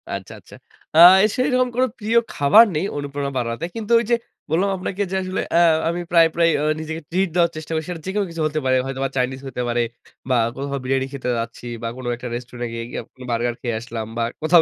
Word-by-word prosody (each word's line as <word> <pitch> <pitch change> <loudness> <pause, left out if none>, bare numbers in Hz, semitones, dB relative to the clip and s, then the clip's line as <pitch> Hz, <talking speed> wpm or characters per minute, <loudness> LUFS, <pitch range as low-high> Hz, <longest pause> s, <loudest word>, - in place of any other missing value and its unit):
আচ্ছা, - - -8
আচ্ছা। - - -18 0.4
আ - - +6 0.4
সেইরকম 255 -1 +2
কোনো 255 +1 +3
প্রিয় 220 +2 +1 0.2
খাবার 205 +11 +7
নেই 155 +5 0
অনুপ্রেরণা 140 -1 -3
বাড়াতে। 115 +5 -2
কিন্তু 225 0 -5
ওইযে, 235 +1 +1 0.3
বললাম 180 +6 +2
আপনাকে 190 +2 -4
যে - - -1
আসলে 185 0 -2 0.2
আ - - +6 0.3
আমি 170 +1 -2
প্রায়, 165 -1 +6
প্রায় 170 -1 +4
আ - - -1 0.2
নিজেকে 160 +1 -5
ট্রিট 185 +2 +1
দেওয়ার 170 -1 +3
চেষ্টা 155 +1 -7
করি। 160 0 -1
সেটা 170 -2 -5
যেকোনো 200 +2 -1
কিছু 165 -1 -5
হতে 155 0 -2
পারে। 130 0 +3
হয়তোবা 135 0 -2
চাইনিজ 130 +1 0
হতে 130 - -4
পারে 120 0 +1 0.5
বা, 130 - +3 0.2
কোথাও 140 +1 -3
বিরিয়ানি 130 +1 0
খেতে 130 -2 -4
যাচ্ছি 115 +1 -6 0.2
বা, 115 - -1
কোনো 130 -1 -6
একটা 125 +1 -7
রেস্টুরেন্টে 120 0 -6
গিয়ে 115 0 -4
গিয়ে - - -4 0.3
বার্গার 120 0 0
খেয়ে 120 -3 -2
আসলাম 115 -1 -6
বা, 115 - +1 0.2
কোথাও 160 +2 +6
150 Hz, 210 wpm, -21 LUFS, 125-180 Hz, 0.5 s, খাবার